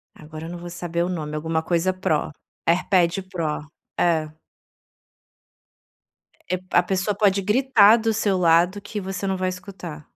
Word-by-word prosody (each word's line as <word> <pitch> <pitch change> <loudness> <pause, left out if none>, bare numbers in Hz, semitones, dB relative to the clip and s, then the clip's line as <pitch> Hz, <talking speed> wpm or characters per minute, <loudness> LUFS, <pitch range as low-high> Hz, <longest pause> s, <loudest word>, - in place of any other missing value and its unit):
agora 155 +1 -10
eu - - -7
não 175 - -6
vou 175 0 -8
saber 170 0 -2
o 180 - -2
nome, 155 -4 -4
alguma 160 +1 -1
coisa 175 +3 0
Pro, 160 -5 -1 0.4
AirPad 180 +1 +2
Pro. 155 -5 -3 0.3
É. 160 -3 +2 2.2
É 185 - +1
a 180 - +4
pessoa 190 +3 -1
pode 200 -2 +2
gritar 225 0 +5
do 225 -1 0
seu 205 -3 +1
lado 175 +3 +3
que 210 +1 -5
você 190 0 -4
não 190 -1 -1
vai 185 0 0
escutar. 180 -5 -8
180 Hz, 155 wpm, -23 LUFS, 165-195 Hz, 2.2 s, gritar